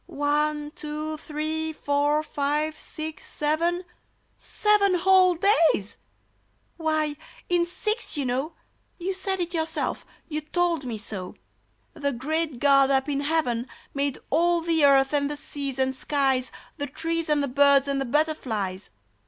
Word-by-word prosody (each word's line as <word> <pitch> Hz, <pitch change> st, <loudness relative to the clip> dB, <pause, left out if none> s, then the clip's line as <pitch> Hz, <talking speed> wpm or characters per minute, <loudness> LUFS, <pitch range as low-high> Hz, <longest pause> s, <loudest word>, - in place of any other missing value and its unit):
*'One, 295 Hz, -1 st, 0 dB
two, 305 Hz, -1 st, -4 dB
three, 315 Hz, +1 st, -3 dB
four, 290 Hz, 0 st, +1 dB
five, 300 Hz, +1 st, -1 dB
six, 310 Hz, 0 st, -6 dB
seven! 335 Hz, +4 st, 0 dB, 0.4 s
— -, -, -42 dB
Seven 415 Hz, -3 st, +2 dB
whole 370 Hz, 0 st, +5 dB
days! 330 Hz, -, +2 dB, 0.8 s
Why, 310 Hz, -2 st, 0 dB, 0.3 s
in 350 Hz, -1 st, +2 dB
six 425 Hz, +2 st, -2 dB
you 280 Hz, -, -1 dB
know 265 Hz, +6 st, -1 dB, 0.4 s
(You 375 Hz, +2 st, -2 dB
said 380 Hz, 0 st, -2 dB
it 350 Hz, 0 st, -3 dB
yourself 320 Hz, -2 st, -2 dB
— -, -, -36 dB
you 305 Hz, -1 st, -3 dB
told 335 Hz, -1 st, 0 dB
me 235 Hz, -3 st, -4 dB
so) 195 Hz, -3 st, -7 dB, 0.6 s
The 285 Hz, -3 st, -2 dB
great 305 Hz, +3 st, -2 dB
GOD 275 Hz, +1 st, +5 dB
up 270 Hz, 0 st, +2 dB
in 280 Hz, -1 st, 0 dB
heaven 280 Hz, -5 st, 0 dB, 0.3 s
Made 280 Hz, -1 st, -1 dB
all 340 Hz, +3 st, +3 dB
the 325 Hz, -2 st, +1 dB
earth 275 Hz, 0 st, +5 dB
and 285 Hz, -1 st, +1 dB
the 295 Hz, -, -4 dB
seas 285 Hz, -3 st, -4 dB
and 265 Hz, 0 st, 0 dB
skies, 265 Hz, -2 st, 0 dB, 0.3 s
The 285 Hz, -1 st, -3 dB
trees 330 Hz, +3 st, -2 dB
and 295 Hz, -1 st, +2 dB
the -, -, 0 dB
birds 280 Hz, +1 st, +4 dB
and 275 Hz, -1 st, 0 dB
the -, -, -1 dB
butterflies 235 Hz, -10 st, -1 dB
300 Hz, 150 wpm, -25 LUFS, 275-330 Hz, 0.8 s, whole